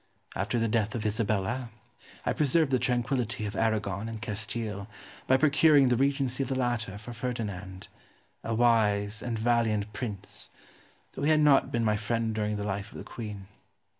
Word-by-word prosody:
After 105 +6 -1
the 115 0 +1
death 110 0 0
of 110 -2 -3
Isabella 110 +2 -1 0.6
I - - +1
preserved 150 0 +2
the 130 - +3
tranquillity 120 -3 0
of 100 - -4
Aragon 110 -2 0
and 110 -1 -6
Castile 105 -2 -3 0.4
by 130 - +5
procuring 145 -1 +5
the 125 - +3
regency 135 0 +1
of 135 - -2
the 135 - 0
latter 120 -6 -1
for 110 +4 -9
Ferdinand, 105 -6 -5 0.6
a 115 - -1
wise 110 -3 +2
and 120 -2 -3
valiant 110 -2 +1
prince, 105 -6 -6 0.6
though - - -7
he 145 - +2
had 155 -1 +5
not 145 -2 +5
been 115 -1 0
my 105 -1 +2
friend 115 +1 -1
during 105 -1 -1
the 105 0 -3
life 100 0 -3
of - - -10
the - - -7
queen. 105 -4 -7
115 Hz, 170 wpm, -29 LUFS, 105-125 Hz, 0.6 s, by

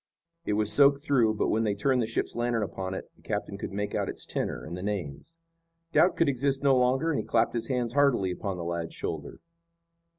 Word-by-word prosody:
It 105 - 0
was 105 0 +3
soaked 140 +2 +5
through, 120 -8 +3
but - - 0
when 110 +1 +1
they 105 -2 0
turned 125 +5 +1
the 110 - -1
ship's 115 - -3
lantern 120 -2 0
upon 95 0 -4
it - - -8
the - - -24
captain 100 - -3
could - - -5
make 105 +1 -3
out - - -1
its - - -5
tenor - - -3
and 85 - -6
the 90 - -6
names. 100 - -5 0.6
Doubt 180 - +4
could 165 - +3
exist 140 +1 0
no 135 -1 +5
longer 130 +6 +2
and 145 - 0
he - - -2
clapped 115 0 +1
his 115 -1 -2
hands 125 -3 -1
heartily 135 -10 +3
upon 95 0 -4
the 85 - -5
lad's 85 -1 -4
shoulder. - - -5
115 Hz, 225 wpm, -28 LUFS, 100-135 Hz, 0.6 s, soaked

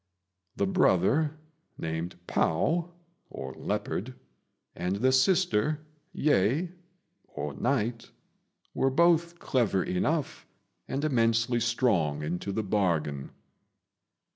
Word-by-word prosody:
The 100 - +1
brother, 120 - +2 0.4
named 80 +3 -4
Pao 160 - +1 0.4
[Leopard], 125 +7 -4 0.6
and 90 +2 -1
the 130 +6 +2
sister, 155 - +2 0.3
Yeh 150 - +2 0.7
[Night], 115 - -1 0.6
were 135 - +2
both 170 +3 +3
clever 115 - +1
enough, 145 - -1 0.4
and 140 +3 -2
immensely 115 -3 +2
strong 100 - +1
into 90 +5 -3
the 110 +3 -1
bargain. 85 -9 0
115 Hz, 85 wpm, -28 LUFS, 90-150 Hz, 0.7 s, both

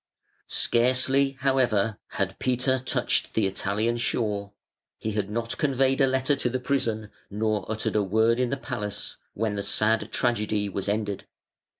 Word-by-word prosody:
Scarcely, 130 +3 +2
however, 120 -6 +2
had 95 -1 -1
Peter 130 +1 +1
touched 130 - 0
the 110 - +3
Italian 105 +4 0
shore 105 -4 -1 0.5
he 110 - -3
had 105 -1 -2
not 115 +2 -3
conveyed 135 -1 +2
a 135 - +5
letter 130 +2 +2
to 125 - 0
the 130 +1 -1
prison 115 -5 -1 0.2
nor 105 +1 -1
uttered 110 0 -2
a 105 - +4
word 110 +4 +2
in 125 -1 +1
the 140 - -1
palace 105 -7 -5 0.2
when 110 0 0
the 100 - -2
sad 110 +2 +1
tragedy 105 -3 +1
was 100 +1 -2
ended. 105 -1 -2
115 Hz, 155 wpm, -26 LUFS, 105-130 Hz, 0.5 s, a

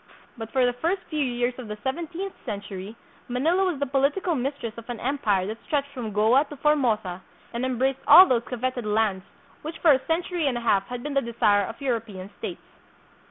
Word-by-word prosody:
But 225 -3 -7
for 260 -2 +3
the 245 - +1
first 340 +9 -1
few 305 -2 +1
years 245 -1 -1
of 245 - -7
the 210 0 -6
seventeenth 340 +7 -3
century, 200 -2 -6 0.3
Manila 320 +10 +1
was 355 -5 -1
the 285 - +1
political 280 +7 +1
mistress 270 -4 -3
of 230 +1 -11
an 240 -2 -4
empire 215 -8 0
that 220 +3 -6
stretched 285 -2 -1
from 245 -6 -5
Goa 220 +7 +4
to 295 - -10
Formosa 225 -12 +1 0.3
and 235 +2 -2
embraced 260 +1 0
all 370 - +11
those 245 -6 +2
coveted 250 0 -2
lands 210 -3 +1 0.4
which 315 +2 -6
for 325 - +5
a 265 -1 +3
century 335 -1 0
and 250 -3 0
a - - -4
half 195 -4 +2
had 245 -1 -6
been 295 - -4
the 275 - +3
desire 210 -4 +2
of 225 - -8
European 220 -7 -3
states. - - -6
250 Hz, 200 wpm, -25 LUFS, 220-285 Hz, 0.4 s, all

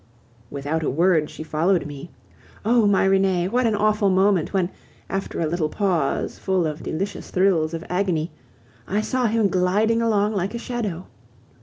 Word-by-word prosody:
Without 145 +3 -3
a 155 - 0
word, 160 +1 +2
she - - -8
followed 160 +2 +1
me. 145 +3 -8 0.6
Oh! 230 -1 +4
my 200 -1 +3
Renee, 190 -2 +2
what 245 +4 +1
an 220 - +1
awful 210 -1 +2
moment 190 -2 +2
when, 190 -2 0 0.4
after 195 0 -3
a 165 - +1
little 155 0 -1
pause 175 -7 -1
full 190 -3 0
of 155 0 -4
delicious 190 +6 -4
thrills 170 -4 +2
of 165 - -6
agony, 180 -4 -1 0.6
I 205 +3 0
saw 250 +2 0
him 220 -1 +2
gliding 205 +5 +2
along 215 -2 +1
like 195 +2 -2
a - - -1
shadow. 220 -8 -4
190 Hz, 165 wpm, -23 LUFS, 165-210 Hz, 0.6 s, Oh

